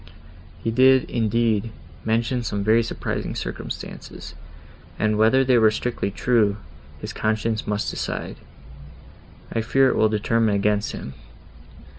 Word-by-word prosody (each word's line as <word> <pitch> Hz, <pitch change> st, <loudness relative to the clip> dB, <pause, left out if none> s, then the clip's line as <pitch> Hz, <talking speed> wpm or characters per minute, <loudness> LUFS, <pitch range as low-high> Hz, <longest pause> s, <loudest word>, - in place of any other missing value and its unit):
He 115 Hz, -, 0 dB
did, 130 Hz, +2 st, +5 dB
indeed, 115 Hz, -1 st, +1 dB, 0.3 s
mention 115 Hz, +3 st, 0 dB
some 105 Hz, -3 st, -3 dB
very 110 Hz, +3 st, +4 dB
surprising 115 Hz, -, -4 dB
circumstances, -, -, -7 dB, 0.6 s
and 110 Hz, 0 st, +1 dB
whether 110 Hz, +5 st, +4 dB
they 125 Hz, -2 st, +4 dB
were 110 Hz, -1 st, +6 dB
strictly 115 Hz, -1 st, -2 dB
true, 105 Hz, -1 st, +1 dB, 0.4 s
his -, -, -7 dB
conscience 110 Hz, 0 st, -1 dB
must 105 Hz, 0 st, -1 dB
decide; -, -, -4 dB, 1.2 s
I 115 Hz, -, 0 dB
fear 135 Hz, +4 st, +3 dB
it -, -, 0 dB
will 110 Hz, -, +3 dB
determine 110 Hz, 0 st, +1 dB
against 105 Hz, +1 st, 0 dB
him. 65 Hz, -, -7 dB
110 Hz, 125 wpm, -23 LUFS, 105-115 Hz, 1.2 s, were